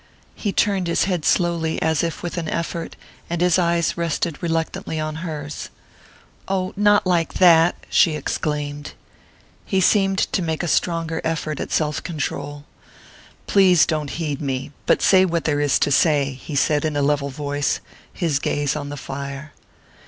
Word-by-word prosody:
He 205 - -3
turned 195 -3 +1
his 170 - +2
head 180 -5 -1
slowly, 170 -3 +1
as 160 -1 +1
if 165 -1 -3
with 175 - -4
an 165 -2 -4
effort, 170 0 -3 0.3
and 170 0 -2
his 180 +1 +3
eyes 170 -1 +1
rested 165 -1 -2
reluctantly 165 -1 -2
on 155 0 -3
hers. 155 -3 -6 0.8
"Oh, 185 -1 -1
not 205 0 +4
like 175 -3 +1
that!" 170 -2 +6
she 160 -3 +3
exclaimed. 145 -1 -3 0.7
He 190 - 0
seemed 195 0 +3
to 185 - 0
make 160 -1 -2
a - - -1
stronger 165 -1 0
effort 155 -2 -2
at - - -5
self 150 -1 0
control. 145 -3 -4 0.8
"Please 185 -4 +5
don't 155 -3 -2
heed 155 -3 -3
me 135 -1 -3 0.2
but - - +3
say 190 -1 +6
what 170 -3 0
there 145 -2 0
is 145 -2 +3
to 145 - +1
say," 145 -1 +3
he 140 +3 -8
said 145 +1 +2
in 155 -2 -1
a 145 - +1
level 140 0 +1
voice, 145 +1 -2 0.3
his 160 -6 -1
gaze 145 0 -1
on 145 -1 -4
the 145 - -6
fire. 140 +2 -7
160 Hz, 165 wpm, -22 LUFS, 145-175 Hz, 0.8 s, that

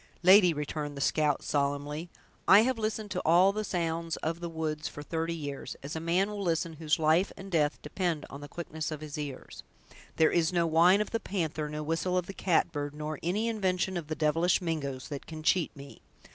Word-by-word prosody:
"Lady," 185 0 +8
returned 150 -1 -4
the - - -4
scout, 150 0 +1
solemnly, 145 +3 -1 0.4
"I 200 +2 +9
have 250 0 0
listened 215 -1 -2
to 180 - -1
all 180 +4 +5
the 215 +1 -2
sounds 165 -3 -2
of 165 +1 -3
the 170 -1 -4
woods 155 -1 -3
for 145 - -8
thirty 165 +2 -2
years, 145 -3 -6
as 145 +3 -5
a - - -2
man 175 +5 +1
will 205 -1 -5
listen 165 -2 0
whose 160 0 +1
life 160 +4 +3
and 195 0 -9
death 150 -3 +1
depend 165 0 -2
on 140 - -9
the 145 - -7
quickness 160 0 -5
of 155 -2 -6
his 150 -2 -7
ears. 145 -3 -6 0.5
There 160 - +4
is 165 -1 +2
no 170 -2 +2
whine 170 +5 +5
of 210 - -3
the 230 - 0
panther, 160 -7 -2
no 150 0 -4
whistle 165 +4 0
of 180 - 0
the 195 - -7
catbird, 145 -6 0
nor 150 0 -4
any 200 +7 0
invention 190 -4 0
of 170 -4 -4
the 155 - -3
devilish 165 +3 +2
Mingoes, 140 -7 -3
that 145 -2 -6
can 155 -1 -8
cheat 175 +1 +3
me! 140 0 -12
165 Hz, 210 wpm, -30 LUFS, 150-180 Hz, 0.5 s, I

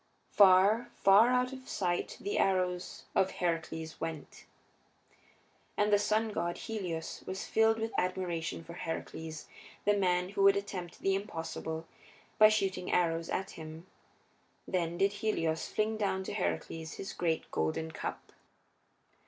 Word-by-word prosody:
Far, 200 +4 +6
far 200 +5 +6
out 250 +1 +2
of 260 0 -10
sight 175 -3 -1
the 205 - -2
arrows 180 -2 0
of 190 - +3
Heracles 165 -2 -3
went. 160 -2 -6 1.3
And 210 0 +3
the 205 - +6
sun 215 +2 +1
god, 170 -2 -2
Helios, 180 -8 -4
was 190 +1 -4
filled 225 0 +3
with 225 0 -3
admiration 175 -3 -2
for 170 - -10
Heracles, 160 -1 -5 0.4
the 205 - +5
man 180 -2 +1
who 200 0 -2
would 195 0 +6
attempt 185 -4 -5
the 195 - +2
impossible 165 -4 -4 0.5
by 215 0 +9
shooting 190 -4 0
arrows 165 -1 +1
at 190 +1 -2
him; 160 +1 -9 0.8
then 170 -2 -1
did 195 +2 +2
Helios 185 -7 -1
fling 215 +1 0
down 190 -3 0
to - - -5
Heracles 155 - -3
his 195 - -6
great 165 -2 -1
golden 80 - -1
cup. - - -6
185 Hz, 135 wpm, -32 LUFS, 165-205 Hz, 1.3 s, by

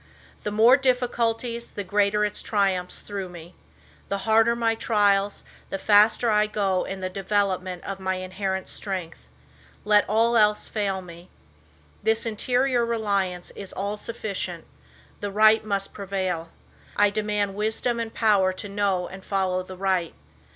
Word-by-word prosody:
The - - -3
more 225 +5 +6
difficulties 240 -2 0
the 205 - -5
greater 205 +2 +2
its 210 - -3
triumphs 190 -4 0
through 195 -3 -5
me. 175 0 -11 0.6
The 200 - 0
harder 225 +1 +4
my 230 -1 +1
trials, 205 -3 +1 0.3
the - - -2
faster 215 +3 +4
I 210 0 +3
go 195 -3 0
in 195 0 -6
the 185 - -1
development 190 -2 -1
of 195 -1 -5
my 190 0 -1
in 185 0 -6
herent 190 -1 -2
strength. 185 -5 -6 0.6
Let 210 -1 +4
all 230 +3 +3
else 210 -2 +3
fail 195 -3 -2
me. 170 +1 -13 0.7
This 220 +1 +1
interior 245 +3 +1
reliance 200 -6 -1
is 195 -2 -8
all 200 +2 -3
sufficient. 200 -6 -5 0.5
The 205 - -3
right 215 +2 +5
must 200 -2 -2
prevail. 185 -4 -3 0.5
I 205 0 +4
demand 210 -1 -1
wisdom 220 +3 -1
and 230 -1 -3
power 205 -5 +3
to 185 - -6
know 200 -3 0
and 190 0 -10
follow 190 -2 0
the 185 0 -10
right. 185 -3 0
205 Hz, 150 wpm, -25 LUFS, 190-220 Hz, 0.7 s, more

